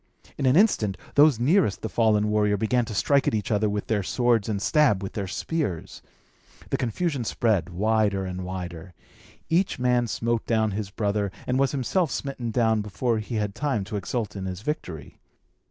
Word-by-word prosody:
In 135 - 0
an 130 - +4
instant, 110 - +3 0.2
those 145 -4 +5
nearest 140 - +2
the - - -1
fallen 105 +1 +2
warrior 105 -1 +2
began 115 +4 +1
to 110 - -6
strike 140 +7 +2
at - - +2
one 105 - 0
another 105 -1 +1
with 105 0 -2
their 110 -2 0
swords 115 +1 +1
and 105 -2 -1
stab 105 -4 +3
with 95 - -5
their 100 -2 -3
spears. 105 - -3 0.7
The - - +1
confusion 140 +3 -1
spread 105 -6 0
wider 100 +1 +1
and 90 0 -5
wider. 90 -1 -7 0.5
Each 180 +4 +1
man 125 -1 +2
smote 115 +1 -1
down 110 -2 +2
his 100 0 -4
brother, 100 -1 -1
and 125 +1 0
was 135 -1 +2
himself 150 +5 0
smitten 130 -2 -4
down 110 -1 +2
before 110 +3 -1
he 110 +2 -5
had 105 -2 -1
time 135 -7 -1
to 100 +2 -6
exult 105 +2 -3
in 95 -1 -5
his 95 0 -5
victory. 90 - -5
110 Hz, 185 wpm, -25 LUFS, 100-125 Hz, 0.7 s, those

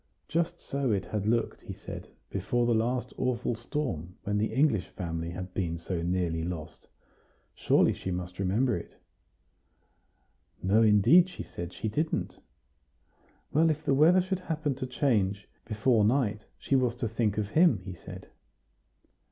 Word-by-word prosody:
Just 170 +1 -1
so 140 -3 -1
it 100 -2 0
had 105 -1 -3
looked, 115 0 0
he - - -7
said, - - -8 0.2
before 120 +5 0
the 120 - +3
last 120 +3 0
awful 125 -2 0
storm, 110 - -4
when 105 0 0
the 110 - 0
English 135 - +2
family 85 -2 -4
had 90 +1 -6
been 85 -3 -2
so 85 +1 -3
nearly 85 -2 0
lost; 85 -2 -6 0.7
surely - - +3
she - - -6
must 90 0 -4
remember 105 +6 +2
it? 85 - -8 1.7
No, 100 +4 +4
indeed, 115 - +6
she - - -7
said, 85 0 -7
she 110 - -4
didn't. 155 +9 -2 1.1
Well, 160 +3 +4
if 155 0 -2
the 140 - +3
weather 165 +7 +6
should 185 0 -2
happen 160 -5 -2
to 130 - -4
change 105 -7 0 0.2
before 110 +1 +2
night, 110 -2 +1
she 140 - 0
was 125 -3 +2
to 120 -1 -2
think 110 -2 0
of 105 -2 -1
him, 160 - +5
he 95 - -5
said. 85 - -10
110 Hz, 155 wpm, -29 LUFS, 95-135 Hz, 1.7 s, indeed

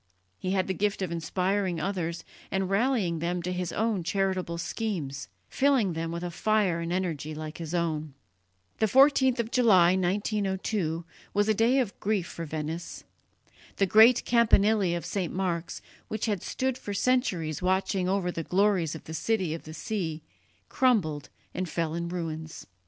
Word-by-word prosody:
He 185 - -2
had 190 -1 +1
the 190 - -1
gift 200 0 -1
of 180 - -3
inspiring 180 +2 -1
others 170 -4 -2 0.3
and 190 0 -1
rallying 200 -6 +1
them 175 +1 -2
to 180 +1 -2
his 180 -1 -3
own 220 -3 0
charitable 185 -1 -1
schemes, 160 - -3 0.2
filling 265 -9 +2
them 165 0 -3
with 170 +1 -4
a 175 - -3
fire 205 -2 +1
and 165 0 -3
energy 165 -5 -2
like 155 +1 -7
his 165 +1 -4
own. 155 -4 -2 0.6
The 220 - +3
14th 265 +1 +5
of 230 0 -1
July, 190 -9 +5
1902, 190 -2 -1 0.3
was 205 +1 +3
a 220 - +4
day 230 +5 +3
of 245 -7 -1
grief 205 -4 0
for 170 -1 -6
Venice. 160 +2 -5 0.7
The 195 - +2
great 220 +5 +6
campanile 220 -2 +4 0.2
of 170 - -7
St. 185 -5 -2
Mark's, 175 -3 -3 0.2
which 215 -1 -3
had 205 -5 -1
stood 260 -1 -2
for 205 - -5
centuries 190 - 0
watching 185 0 +1
over 190 -2 0
the 165 - -4
glories 185 -3 +1
of 160 - -9
the 160 - -8
City 185 -2 0
of 165 - -7
the 155 - -8
Sea, 165 -5 -3 0.4
crumbled 180 - +1 0.2
and 185 -1 -3
fell 165 -2 -1
in 170 0 -3
ruins. 160 -2 -5
185 Hz, 165 wpm, -28 LUFS, 165-210 Hz, 0.7 s, great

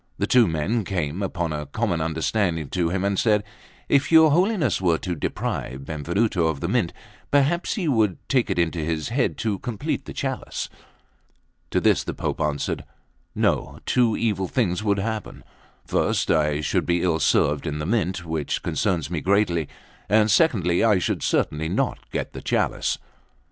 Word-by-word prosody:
The - - 0
two 120 -4 +5
men 85 +8 0
came, 90 -2 -2
upon 85 -4 -2
a 75 -1 -4
common 90 0 -1
understanding, 80 0 -1
to 85 -2 0
him 95 +2 -1
and 100 -1 +1
said: 105 -3 +3 0.4
"If 140 +1 +2
your 160 -2 +7
Holiness 185 - +2
were 85 -3 +3
to 90 - -3
deprive 70 -4 -3
Benvenuto 85 +4 0
of 80 -3 -2
the - - -2
Mint, - - +1 0.4
perhaps 145 +5 +2
he 185 -6 -2
would 110 - +2
take 130 -3 +2
it - - -1
into 85 0 +1
his 80 0 -2
head 125 +2 0
to 105 -4 -1
complete 115 -5 -3
the - - -7
chalice." - - -4 1.0
To - - +1
this - - +3
the - - -5
Pope - - -3
answered" 75 -2 -1 0.5
"No; - - 0
two 120 -3 +2
evil 100 -5 0
things 105 -4 0
would 100 -2 +2
happen: 110 +1 -4 0.4
first, - - +1
I 75 -1 +2
should 75 - 0
be 85 0 +1
ill 85 -3 +1
served 75 0 +2
in 75 -1 -2
the 75 - -3
Mint, 95 -3 -1
which 80 -3 -2
concerns 90 -6 -1
me 80 -3 -2
greatly; 95 -6 +1 0.4
and 110 +1 +4
secondly, 95 - +3
I 110 -3 +5
should 90 - -1
certainly 80 +2 0
not - - -2
get - - -4
the - - -7
chalice." - - 0
90 Hz, 170 wpm, -24 LUFS, 80-110 Hz, 1.0 s, your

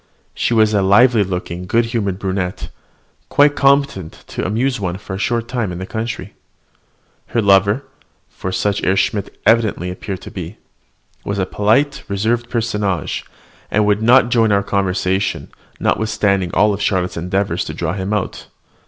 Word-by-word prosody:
She 120 - 0
was 110 -1 +4
a 100 - +3
lively 105 +4 +5
looking, 90 -1 -5
good 115 +4 +2
humoured 100 -5 -1
brunette, 95 -2 -3 0.6
quite 145 0 +4
competent 140 - +1
to - - -4
amuse 115 +7 0
one 90 -2 -2
for 100 -1 -8
a 95 - -4
short 115 +2 -1
time 120 -6 -2
in 90 - -5
the 95 - -5
country. 110 +2 -5 0.9
Her 120 - -1
lover 100 +4 +4 0.4
(for 95 - -6
such 100 +2 0
Herr 95 - +2
Schmidt 100 0 -1
evidently 110 -5 +2
appeared 95 +1 -6
to - - -9
be) 90 +1 -7 0.7
was 100 - -3
a 95 - +1
polite, 110 +10 +1
reserved 115 +4 -1
personage, 105 -6 -1 0.5
and 105 0 +2
would 105 +1 +2
not 120 +2 +5
join 115 -3 +3
our 100 0 +3
conversation, 95 0 -1 0.3
notwithstanding 100 -4 +1
all 105 0 +4
Charlotte's 95 -3 0
endeavours 90 +1 -1
to 80 - -5
draw 85 0 -2
him 95 +1 -3
out. 105 -3 -3
100 Hz, 155 wpm, -18 LUFS, 95-115 Hz, 0.9 s, lively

